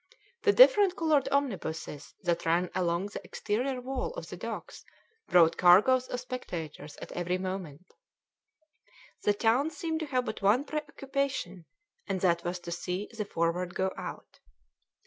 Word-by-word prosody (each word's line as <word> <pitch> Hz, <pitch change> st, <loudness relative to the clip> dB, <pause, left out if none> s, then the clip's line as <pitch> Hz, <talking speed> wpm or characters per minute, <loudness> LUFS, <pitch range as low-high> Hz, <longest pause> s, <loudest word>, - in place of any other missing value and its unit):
The 415 Hz, -, +5 dB
different 410 Hz, -5 st, +7 dB
coloured 310 Hz, -4 st, +2 dB
omnibuses 180 Hz, -, -2 dB
that 170 Hz, 0 st, 0 dB
ran 170 Hz, +2 st, +1 dB
along 180 Hz, +1 st, 0 dB
the -, -, -7 dB
exterior 250 Hz, +5 st, -2 dB
wall 265 Hz, -, -3 dB
of -, -, -7 dB
the -, -, -6 dB
docks -, -, -7 dB, 0.4 s
brought 170 Hz, -2 st, +5 dB
cargoes 215 Hz, +9 st, +6 dB
of 250 Hz, -, -3 dB
spectators 165 Hz, -, -6 dB
at -, -, -9 dB
every 180 Hz, +1 st, -1 dB
moment; 185 Hz, -4 st, -5 dB, 1.4 s
the 205 Hz, -, +2 dB
town 240 Hz, +8 st, +2 dB
seemed 325 Hz, -1 st, -3 dB
to 315 Hz, -, -4 dB
have 255 Hz, -3 st, 0 dB
but 215 Hz, -, -5 dB
one 210 Hz, +7 st, +4 dB
pre 305 Hz, +1 st, -2 dB
occupation, 270 Hz, -, -3 dB, 0.4 s
and 195 Hz, -2 st, -1 dB
that 170 Hz, -2 st, +2 dB
was 175 Hz, +1 st, -2 dB
to 170 Hz, -, -7 dB
see 180 Hz, +3 st, -3 dB
the 215 Hz, -2 st, -3 dB
Forward 175 Hz, 0 st, -1 dB
go 190 Hz, 0 st, 0 dB
out. -, -, -8 dB
200 Hz, 150 wpm, -29 LUFS, 175-270 Hz, 1.4 s, different